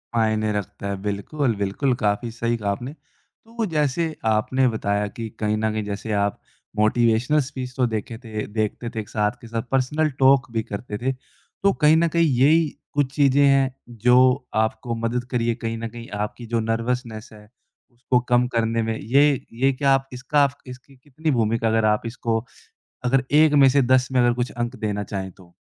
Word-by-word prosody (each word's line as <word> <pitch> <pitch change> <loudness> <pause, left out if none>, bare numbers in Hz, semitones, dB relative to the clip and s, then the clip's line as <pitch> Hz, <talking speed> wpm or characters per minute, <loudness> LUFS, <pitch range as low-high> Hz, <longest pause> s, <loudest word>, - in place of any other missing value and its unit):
मायने 110 -1 +1
रखता 100 0 -5
है 100 - -2
बिल्कुल, 110 +6 -1
बिल्कुल। 100 +7 0
काफ़ी 105 +1 -1
सही 115 +1 -1
कहा 105 -2 -1
आपने। 125 +7 -5
तो 225 +7 -9
जैसे 155 +1 0
आपने 110 +4 +2
बताया 105 -3 -1
कि 115 +2 -7
कहीं 105 0 0
न 110 0 0
कहीं 110 0 -2
जैसे 105 +2 -5
आप 100 0 0 0.4
मोटिवेशनल 115 +6 +3
स्पीच 130 -2 -6
तो 130 - +3
देखे 110 0 -4
थे, 110 -3 -5
देखते 110 +2 -3
थे 115 - -5
एक 105 - -7
साथ 105 -1 0
के 115 - -11
साथ 115 0 -2
पर्सनल 150 +4 +1
टॉक 135 -1 +4
भी 115 -1 -1
करते 105 +1 -6
थे, 130 +4 -1
तो 195 +8 -4
कहीं 150 -1 +4
न 170 +1 +3
कहीं 170 +1 +2
यही 155 +4 +5 0.3
कुछ 145 -2 0
चीज़ें 140 -1 +4
हैं, 135 -1 +3 0.2
जो 125 +3 +3
आपको 110 +2 -2
मदद 115 +2 -2
करी 120 -2 0
है 115 - +1
कहीं 115 -1 -4
न 115 0 -4
कहीं 120 +1 -10 0.2
आपकी 120 +3 -10
जो 115 - +3
नर्वसनेस 115 0 -2
है 105 0 -15 0.4
उसको 125 +1 0
कम 125 0 +3
करने 115 0 +1
में। 110 0 -2
ये 140 +7 +4 0.3
ये 135 +1 +4
क्या 140 +1 +1
आप 135 0 0
इसका 140 +3 +2 0.2
इसकी 130 +2 -12
कितनी 145 +4 -3
भूमिका 115 -2 +1
अगर 110 0 +2
आप 105 0 +2
इसको 115 -1 -2 0.6
अगर 130 +1 +2
1 155 +1 +5
में 135 - +8
से 140 +1 +3
10 130 +1 +3
में 130 - +3
अगर 120 0 +4
कुछ 120 0 -2
अंक 120 +1 -4
देना 105 -2 -2
चाहें 95 -1 -5
तो? 90 -2 -19
120 Hz, 190 wpm, -23 LUFS, 110-135 Hz, 0.6 s, में